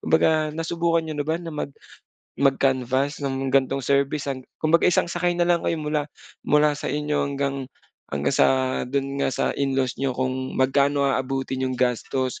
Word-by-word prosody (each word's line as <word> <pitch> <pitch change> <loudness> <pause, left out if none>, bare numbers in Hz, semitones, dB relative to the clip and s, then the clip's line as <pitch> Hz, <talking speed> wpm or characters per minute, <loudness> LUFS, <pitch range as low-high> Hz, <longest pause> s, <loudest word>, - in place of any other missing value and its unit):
Kumbaga 155 -1 +2
nasubukan 165 +1 0
niyo 155 -1 -5
na 145 - -1
ba 160 - +2
na 170 - -7
mag 150 -1 -4 0.7
mag-canvass 135 0 +1
ng 135 -1 -2
ganitong 135 0 +2
service 140 +1 +1
hang 135 -2 -3 0.2
kumbaga 165 +2 +3
isang 180 - +3
sakay 175 0 -1
na 175 - +3
lang 175 -1 +2
kayo 165 - -1
mula 150 -1 -2 0.4
mula 150 0 +4
sa 145 - -4
inyo 150 0 -1
hanggang 140 -1 -2 0.4
hanggang 70 - -1
sa - - +5 0.4
do'n 140 +1 -2
nga - - +2
sa - - -1
in-laws 135 -2 -1
niyo 135 -2 -1
kung 130 0 -2
magkano 140 +2 +2
aabutin 135 -1 -1
nyo'ng 130 -1 -1
gastos. 125 +1 -1
140 Hz, 170 wpm, -24 LUFS, 130-150 Hz, 0.7 s, sa